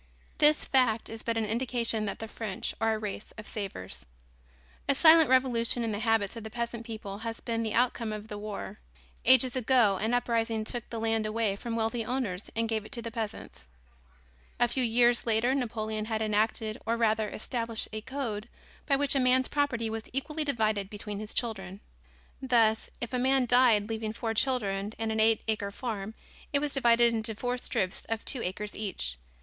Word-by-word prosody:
This 300 0 +5
fact 245 -4 +2
is 225 0 -7
but 230 -1 -1
an 225 - +1
indication 230 -1 -1
that 200 - -3
the 225 - -6
French 215 -3 -4
are 225 0 +2
a - - -2
race 210 -1 -6
of 215 - -9
savers. 195 - -6 0.9
A 280 - +4
silent 320 0 +7
revolution 245 -2 +3
in 225 - -1
the 205 - -3
habits 225 -2 +1
of 230 - -7
the 220 - -6
peasant 235 0 -4
people 210 -3 -6
has 225 0 -5
been 230 -1 -2
the 220 -2 -2
outcome 235 -2 +1
of 215 0 -6
the 210 -1 -6
war. 210 -1 -6 0.5
Ages 260 0 +5
ago 240 -5 +3
an 220 +5 0
uprising 230 -2 0
took 240 +1 -5
the 230 - -4
land 225 -1 0
away 215 -2 0
from 230 +3 -5
wealthy 230 +1 -1
owners 220 -6 -3
and 230 0 0
gave 220 -2 -1
it 215 - -13
to 235 -3 -1
the 230 - -5
peasants. 215 - -6 0.9
A 240 - +4
few 255 +2 0
years 240 +1 +3
later 230 +3 +2
Napoleon 220 -4 -2
had 220 0 -1
enacted 215 +2 0
or 230 +1 0
rather 220 -2 +1
established 230 -1 -3
a 215 - -3
Code 235 -4 -4 0.4
by 280 - +4
which 285 0 +1
a 275 - +2
man's 255 0 +3
property 270 -6 0
was 220 0 -5
equally 300 +4 -2
divided 215 -8 0
between 205 -1 -6
his 215 0 -5
children. 195 -5 -2 0.6
Thus, 230 -4 +3
if 240 +1 -4
a 250 - +1
man 265 0 +3
died 245 -4 +4
leaving 220 -1 -3
four 225 0 -3
children 210 -5 0
and 225 -1 -2
an 220 - -1
eight 220 0 +3
acre 215 -2 -1
farm, 215 -1 -5 0.4
it 290 - +3
was 290 0 0
divided 235 -3 +4
into 220 -1 +4
four 245 +3 -2
strips 190 -5 -2
of 225 -1 -3
two 255 - +1
acres 205 +2 -4
each. 65 - -3
225 Hz, 190 wpm, -29 LUFS, 215-245 Hz, 0.9 s, silent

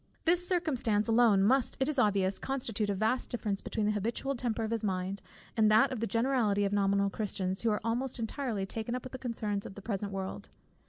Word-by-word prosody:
This 350 +2 +4
circumstance 255 - +1
alone 225 -4 +4
must, 255 +4 +2
it 265 - +1
is 300 -3 0
obvious, 195 -4 +2
constitute 230 -6 -2
a 200 - 0
vast 220 +6 0
difference 210 -5 -2
between 215 - -2
the 210 - +2
habitual 230 +6 -2
temper 235 -2 -2
of 220 - -3
his 230 -1 -1
mind, 190 0 -2 0.3
and 220 -2 +4
that 220 +6 +5
of 255 - -3
the 230 - -1
generality 230 -3 +1
of 200 - -1
nominal 200 0 +2
Christians, 190 -3 -2
who 230 - +2
are 210 - 0
almost 240 +3 -1
entirely 230 -3 -2
taken 225 +4 -3
up 250 - -4
with 255 - -7
the 260 - -7
concerns 215 -5 -2
of 190 - -8
the 200 - -9
present 200 -2 -3
world. 190 -1 -5
220 Hz, 215 wpm, -31 LUFS, 200-245 Hz, 0.3 s, that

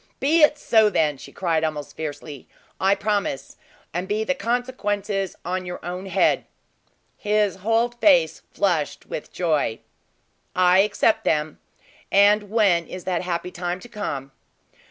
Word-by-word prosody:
"Be 315 +4 +3
it 300 0 +5
so 220 -6 +4
then!" 150 -7 +1
she - - -11
cried 165 -4 0
almost 155 -2 -3
fiercely. 150 -2 -7 0.3
"I 195 +1 +3
promise, 200 -9 -2 0.4
and 180 +3 -3
be 215 +2 0
the 275 - 0
consequences 210 -6 -2
on 185 +1 -2
your 180 0 -6
own 180 +2 -5
head." - - +2 0.7
His 210 -2 +1
whole 225 +4 +1
face 240 - +3
flushed 170 -7 -1
with - - -7
joy. 155 -10 0 0.8
"I 180 0 +5
accept 210 +2 +2
them. 150 0 0 0.5
And 205 +1 +4
when 195 -6 +2
is 185 - -8
that 180 -2 -1
happy 180 0 -3
time 175 +1 -4
to 245 - -11
come?" 140 - -5
190 Hz, 140 wpm, -23 LUFS, 170-210 Hz, 0.8 s, it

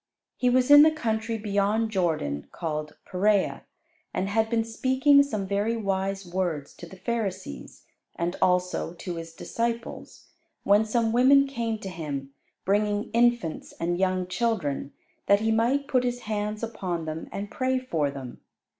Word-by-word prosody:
He 250 - +1
was 255 +2 +3
in 290 0 +11
the 310 - +8
country 225 -6 -2
beyond 210 +1 0
Jordan, 160 - -1
called 155 -2 -4
Peræa, 200 +2 +1 0.5
and 195 - -1
had 220 +2 +1
been 230 -1 +1
speaking 260 +5 +4
some 215 -8 -2
very 205 +4 0
wise 195 -2 -2
words 175 -5 -3
to 175 - -9
the 190 - -12
Pharisees, 190 - -4 0.3
and 170 +1 -2
also 180 -1 +1
to 175 0 -6
His 165 0 -7
disciples, 230 +7 -4 0.3
when 205 +2 +4
some 225 +1 +1
women 275 +3 +6
came 235 -5 -2
to 195 - -5
Him, 145 -6 -5 0.3
bringing 205 +1 +1
infants 235 -8 +1
and 175 +1 -2
young 185 -1 +1
children 180 - -1 0.4
that 200 +1 +5
He 220 0 +1
might 245 +6 +1
put 255 -3 +2
His 245 0 -2
hands 210 0 -3
upon 185 -7 -3
them 155 +1 -5
and 200 +1 -5
pray 260 0 0
for 165 - -1
them. 135 -3 -8
205 Hz, 155 wpm, -26 LUFS, 180-235 Hz, 0.5 s, in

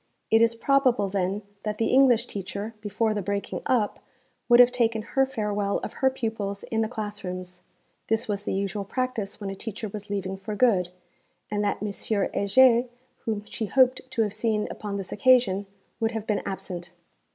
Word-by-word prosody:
It 225 0 +6
is 230 0 +4
probable 250 -5 +2
then 195 +1 -1 0.2
that 210 -1 -3
the 225 - +1
English 260 -3 +5
teacher, 200 +3 -5
before 215 +1 0
the 210 - -2
breaking 200 +1 -3
up, 230 -5 +1 0.5
would 240 0 +7
have 245 0 +8
taken 230 -3 +1
her 270 +4 +1
farewell 210 -5 -1
of - - -5
her 265 - +5
pupils 220 -6 -3
in 225 -1 -1
the 220 - +1
class 210 -3 -5
rooms 180 -1 -6 0.5
this 225 0 +1
was 205 -2 -2
the - - -2
usual 200 +1 -2
practice 240 -2 -3
when 200 -2 -4
a - - -6
teacher 220 +1 -6
was 205 0 -8
leaving 195 -1 -3
for 210 +2 -5
good 200 -7 +3 0.6
and 205 0 0
that 205 0 -1
M. 210 - -1
Heger, 230 +4 +3 0.4
whom 215 -3 -2
she 220 - -4
hoped 255 +2 +4
to 245 -3 +1
have 205 -2 -2
seen 215 -1 0
upon 205 -2 -5
this 195 -2 -5
occasion, 210 -4 +3 0.3
would 225 0 0
have 220 -2 -4
been 210 -2 0
absent. 175 -2 -6
210 Hz, 185 wpm, -26 LUFS, 200-230 Hz, 0.6 s, have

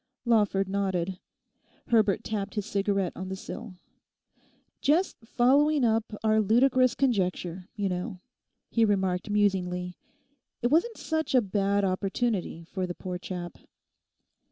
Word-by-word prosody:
Lawford 205 -4 +2
nodded. 190 -2 -1 0.7
Herbert 215 -5 +3
tapped 205 -2 -3
his 210 -2 -2
cigarette 200 -3 0
on 185 0 -6
the 190 - -3
sill. 210 +1 -8 1.1
'Just 325 +7 +2
following 275 +4 +3
up 225 -1 +1
our 220 0 +4
ludicrous 255 +4 +4
conjecture, 185 -7 -1
you 205 -2 -1
know,' 180 0 -3 0.5
he 230 - +3
remarked 190 -2 +1
musingly, 180 -3 0 0.6
'it 240 - +2
wasn't 390 +10 +2
such 315 -4 -1
a - - +8
bad 200 0 +1
opportunity 195 -1 -1
for 185 +2 -4
the 175 - -5
poor 180 -1 -5
chap. 175 -2 -6
200 Hz, 125 wpm, -28 LUFS, 185-230 Hz, 1.1 s, a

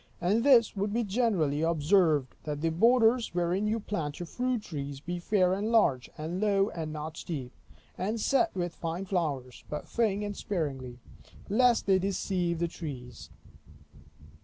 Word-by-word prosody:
And 200 +6 +2
this 245 -6 +5
would 200 +1 -1
be 235 +3 0
generally 190 - +1
observed, 160 -3 +2
that 150 -1 -3
the 165 0 +1
borders 230 +3 +3
wherein 180 +4 +1
you 220 +2 0
plant 165 -9 -4
your 175 - -4
fruit 250 +4 -2
trees, 140 -5 -5
be 175 +4 -4
fair 185 0 +2
and 205 +4 -1
large, 145 - +3
and 165 +5 -4
low, 200 -1 +2
and 160 -2 -5
not 155 +1 -6
steep; 135 -7 -5 0.5
and 210 +5 -1
set 280 +9 +2
with 175 -2 -2
fine 170 +4 -4
flowers, 145 -10 -2
but 150 - -5
thin 210 -3 0
and 205 0 -4
sparingly, 135 -12 -3 0.5
lest 240 +3 +3
they 190 -1 +4
deceive 180 -2 -1
the 170 +1 0
trees. 140 -7 -8
180 Hz, 160 wpm, -29 LUFS, 155-210 Hz, 0.5 s, this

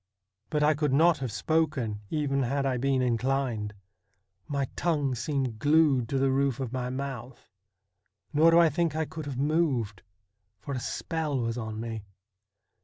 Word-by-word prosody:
But 150 -1 +1
I 150 +1 +5
could 150 -2 0
not 160 +2 +4
have 130 -4 -3
spoken 125 -2 0
even 140 -3 0
had 135 +2 0
1 130 -3 0
been 135 -1 +2
inclined; 120 -3 -1 0.7
my 140 -2 -1
tongue 145 -6 0
seemed 125 -2 -2
glued 145 -4 +3
to 135 - 0
the 135 0 +2
roof 135 -2 +1
of 130 -2 -4
my 125 -1 -2
mouth; 130 -2 -6 0.8
nor 155 +3 +6
do 165 - +5
I 170 -1 +7
think 165 +1 0
I 160 0 0
could 155 0 -7
have 135 -3 -4
moved, 135 - 0 0.6
for 140 - -6
a 130 - -2
spell 155 +1 -2
was 115 -1 -1
on 110 -2 -5
me. 115 -1 -4
135 Hz, 165 wpm, -28 LUFS, 120-150 Hz, 0.8 s, I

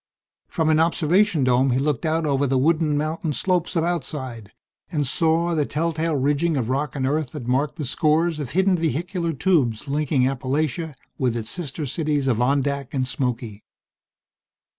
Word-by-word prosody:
From 160 -2 0
an 155 - +3
observation 165 +1 +2
dome 130 +1 +3
he 125 - +2
looked 145 +1 0
out 160 +1 0
over 140 -1 +1
the 135 0 +1
wooded 160 +5 +3
mountain 155 +2 -1
slopes 180 +2 0
of 165 - +2
Outside, 130 - -4 0.4
and 150 -4 0
saw 165 +4 +1
the 155 -2 +2
telltale 160 +2 -1
ridging 145 +4 +1
of 120 -3 -1
rock 140 +3 -1
and 135 -2 -1
earth 150 0 -1
that 145 -6 -6
marked 135 +4 0
the 155 -4 -4
scores 155 +4 +1
of 140 -5 -4
hidden 190 +2 +2
vehicular 170 +2 -1
tubes 145 - +1
linking 145 -1 +1
Appalachia 140 +4 -2 0.2
with 125 -3 +1
its 115 -1 -4
sister 155 -3 -4
cities 150 0 -1
of 120 -3 +1
Ondack 140 +1 0
and 130 -1 0
Smoky. 120 -4 -3
150 Hz, 165 wpm, -23 LUFS, 130-165 Hz, 0.4 s, an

